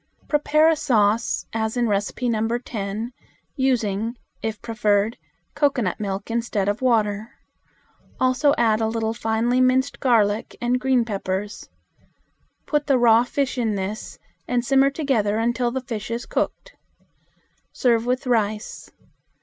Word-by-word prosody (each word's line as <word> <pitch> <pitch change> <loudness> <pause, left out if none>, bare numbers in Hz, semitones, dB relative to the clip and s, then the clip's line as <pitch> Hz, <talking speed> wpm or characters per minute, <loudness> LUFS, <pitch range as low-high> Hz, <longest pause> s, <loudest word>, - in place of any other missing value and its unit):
Prepare 305 +1 +3
a 325 - +4
sauce, 230 -6 +1
as 220 +1 -1
in 240 - +2
No. 225 +2 0
10, 220 0 -5 0.4
using, 230 -4 0 0.2
if 220 -1 -3
preferred, 215 -1 +1 0.4
cocoanut 265 - 0
milk 200 +1 -4
instead 230 -4 -1
of 205 +4 -1
water. 220 -3 +1 0.9
Also 260 +3 +3
add 225 -2 +2
a 220 - +1
little 225 0 -1
finely 230 +3 +1
minced 260 +2 +2
garlic 220 -4 +2
and 245 +1 +1
green 255 -2 +2
peppers. 200 -1 -4 1.0
Put 295 -1 0
the 275 - +4
raw 235 -1 +5
fish 265 +1 -2
in 220 -3 0
this 200 +2 -5 0.3
and 245 -1 0
simmer 270 +1 +4
together 260 -8 0
until 240 +2 +1
the 260 +2 -3
fish 230 -4 -5
is 235 +1 -3
cooked. - - -3 1.0
Serve 235 -2 +1
with 255 +2 0
rice. 215 -3 -1
230 Hz, 130 wpm, -23 LUFS, 215-255 Hz, 1.0 s, raw